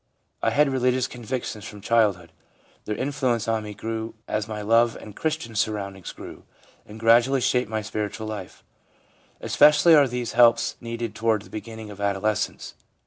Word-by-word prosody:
I - - +2
had 150 0 +3
religious 125 -1 +1
convictions 120 -3 -5
from 105 - -9
child 105 -2 +3
hood; 85 -2 -17 0.5
their 105 - -2
influence 130 -4 -1
on 110 -1 0
me 105 -1 -8
grew 110 +1 -5
as 105 0 -2
my 105 -1 -5
love 115 +2 +3
and 105 -2 -11
Christian 160 -7 -3
surroundings 100 -3 -2
grew, - - -11 0.4
and 105 +1 -11
gradually 120 +4 +4
shaped 125 -2 +1
my 110 -1 -2
spiritual 105 +1 -4
life/ 105 -4 -7 0.8
Especially 150 +3 +5
are 145 -3 +6
these 125 -1 -3
helps 120 -1 +4
needed 115 -1 -4
toward 110 -1 0
the - - -17
beginning 110 0 -8
of 100 0 -10
adolescence. 100 +1 -1
115 Hz, 160 wpm, -24 LUFS, 105-125 Hz, 0.8 s, are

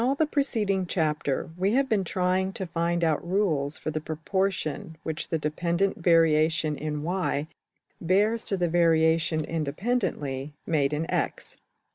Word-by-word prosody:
throughout 270 +3 +1
the 315 - +3
preceding 215 -11 0
chapter} 150 -4 -1
we 190 +4 +1
have 270 +2 +3
been 215 -5 +1
trying 185 +1 0
to 190 - -5
find 170 0 -1
out 160 -3 +1
rules 170 -6 0
for 155 - -4
the 155 0 -3
proportion 165 0 -2
which 160 -1 -4
the 165 - +1
dependent 170 +5 0
variation 160 -2 +3
in 150 0 -4
$y$~bears 185 +5 -1
to 195 - -1
the 175 -1 +1
variation 160 -2 +3
independently 155 - -2
made 145 -4 +1
in~$x$. 155 +2 -2
165 Hz, 135 wpm, -27 LUFS, 155-190 Hz, -, the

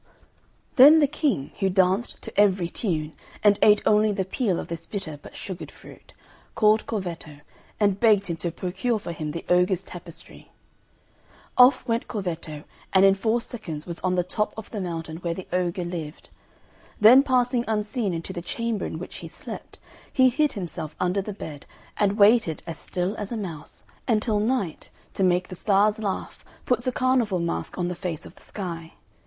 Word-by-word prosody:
Then 290 +5 +10
the 295 - +5
King, 280 - -1
who 195 -2 +2
danced 190 +4 +1
to 225 - -8
every 195 -4 +3
tune, 160 -7 -2 0.3
and 205 -1 +5
ate 210 -1 +6
only 215 0 +4
the 195 -2 -1
peel 190 -2 0
of - - -6
this 165 0 -7
bitter 165 -8 -6
but - - -13
sugared 185 -3 -7
fruit, - - -16 0.4
called 215 0 +3
Corvetto, 170 -8 -5 0.4
and 200 -2 +2
begged 210 -4 +4
him 170 - -3
to 170 - -2
procure 190 +7 -2
for 200 - -6
him 155 -2 -4
the 165 +3 -6
ogre's 180 +1 +2
tapestry. 175 -3 -12 1.0
Off 255 +1 +6
went 230 0 0
Corvetto 165 -7 -5 0.3
and 190 0 +6
in 195 - +7
four 220 +4 0
seconds 165 -12 -7
was 170 -1 -6
on 185 0 0
the 180 - +2
top 210 +4 -2
of 220 - -8
the 210 - -4
mountain 165 -3 -5
where 170 -1 -3
the 190 - -8
ogre 180 0 0
lived; 165 -3 -7 0.7
then 235 +6 +9
passing 250 -3 +1
unseen 215 0 -1
into 165 +2 -5
the 175 - -5
chamber 230 +3 -3
in - - -5
which 180 - -8
he - - -8
slept, - - -9 0.3
he 260 -1 +5
hid 295 +3 +1
himself 170 -6 -6
under 180 +2 +1
the 210 - -6
bed, 155 -7 -8 0.3
and 205 0 +1
waited 210 -6 +4
as 165 -1 -6
still 180 +3 -3
as 205 0 -5
a 235 - -2
mouse, 170 -8 -7 0.2
until 215 -2 +1
Night, 210 -6 -1 0.2
to - - -3
make 180 0 +2
the 185 - -7
Stars 205 +3 +2
laugh, 200 -3 -4 0.2
puts 245 0 0
a - - +2
carnival 250 -6 +1
mask 170 -1 -3
on 180 -1 -1
the 180 - -2
face 170 -2 -5
of - - -11
the - - -21
Sky. 170 -5 -6
195 Hz, 180 wpm, -25 LUFS, 175-220 Hz, 1.0 s, Then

